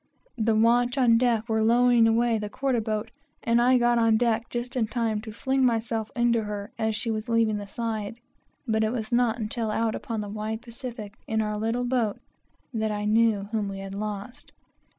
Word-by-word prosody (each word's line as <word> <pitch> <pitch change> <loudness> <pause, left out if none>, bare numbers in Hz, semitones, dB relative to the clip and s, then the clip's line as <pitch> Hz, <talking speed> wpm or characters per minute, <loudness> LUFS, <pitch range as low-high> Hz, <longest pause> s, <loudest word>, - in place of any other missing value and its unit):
The 220 0 +2
watch 240 +3 +3
on 235 -3 +5
deck 235 -2 +1
were 220 -1 +1
lowering 240 +1 +5
away 230 0 +2
the 210 -1 -4
quarter 255 0 0
boat, 215 0 -3 0.3
and 235 0 +3
I 250 +1 +5
got 240 -1 +3
on 225 -1 +4
deck 230 0 0
just 245 +2 -4
in 230 -4 +1
time 220 -2 -1
to 220 - -9
heave 265 +5 -1
myself 225 -3 0
into 235 -2 +2
her 205 -1 -5
as 220 -1 0
she 220 +2 -2
was 215 +2 -4
leaving 225 -2 +2
the 205 -1 -6
side; 225 0 -4 0.5
but 220 -1 +1
it 220 - +1
was 220 -3 -4
not 240 -1 +2
until 225 0 -3
out 225 +1 0
upon 225 -2 -4
the 205 - -5
wide 215 +2 -4
Pacific, 235 -3 -7
in 220 0 0
our 210 -1 -1
little 225 +3 -1
boat, 240 -5 0 0.6
that 220 -1 -1
I 210 0 -3
knew 215 -2 +2
whom 215 -3 -1
we 195 - -6
had 195 0 -7
lost. 210 +3 -6
225 Hz, 200 wpm, -26 LUFS, 215-240 Hz, 0.6 s, on